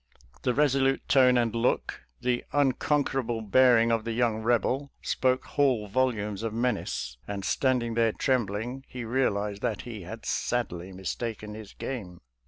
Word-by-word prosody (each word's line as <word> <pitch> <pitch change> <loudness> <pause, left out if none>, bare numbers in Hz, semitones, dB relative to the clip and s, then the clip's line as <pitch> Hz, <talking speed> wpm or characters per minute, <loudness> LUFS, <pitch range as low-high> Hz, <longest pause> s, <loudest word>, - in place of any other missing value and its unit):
The 125 - 0
resolute 135 -2 +2
tone 130 -2 +5
and 115 -2 +1
look, 115 +2 0 0.2
the 125 -1 0
uncon 145 +1 +2
querable 120 -5 -2
bearing 115 0 +5
of 115 -1 +1
the 115 0 -3
young 115 -2 +1
Eebel, 125 +4 +1
spoke 130 0 +1
whole 130 -7 +1
volumes 105 -3 0
of 115 -1 -3
menace, 115 - -2
and 100 -1 -4
standing 125 +1 +1
there 115 -1 +3
trembling, 120 +1 -1
he 125 -2 -6
realized 105 -5 0
that - - -1
he 115 -4 -7
had 110 +6 -8
sadly 95 -7 -2
mis 95 0 -4
taken 110 -3 -5
his 110 -2 -10
game. 95 -10 -6
120 Hz, 155 wpm, -28 LUFS, 105-130 Hz, 0.2 s, tone